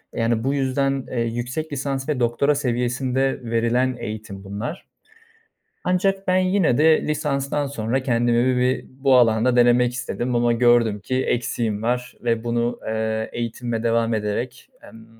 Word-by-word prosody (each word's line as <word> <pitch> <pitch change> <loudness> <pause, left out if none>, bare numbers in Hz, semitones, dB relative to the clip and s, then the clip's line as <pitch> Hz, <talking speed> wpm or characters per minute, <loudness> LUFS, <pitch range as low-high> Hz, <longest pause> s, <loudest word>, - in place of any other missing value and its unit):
Yani, 115 0 0
bu 135 +2 0
yüzden, 135 0 0
eee, 125 - -2
yüksek 120 +7 -3
lisans 135 0 -3
ve 145 -4 0
doktora 125 +5 +2
seviyesinde 130 0 0
verilen 120 +2 +1
eğitim 105 -3 -7
bunlar. 105 - -6 1.0
Ancak 195 +2 0
ben 185 - +3
yine 185 -8 +2
de 160 +1 +5
lisanstan 145 -1 -1
sonra 130 -1 -2
kendimi 120 0 +2
bir 125 +1 0
bu 135 0 +2
alanda 120 +1 +3
denemek 120 0 +4
istedim 125 0 -3
ama 120 0 +3
gördüm 115 -3 +3
ki 130 +5 -1
eksiğim 115 -3 -1
var 125 +1 -2
ve 115 -1 0
bunu, 120 0 -1
eee, 110 0 -2
eğitimime 120 0 -3
devam 115 0 +1
ederek, 110 +4 -3 0.2
emm, 115 0 -14
120 Hz, 140 wpm, -22 LUFS, 115-135 Hz, 1.0 s, de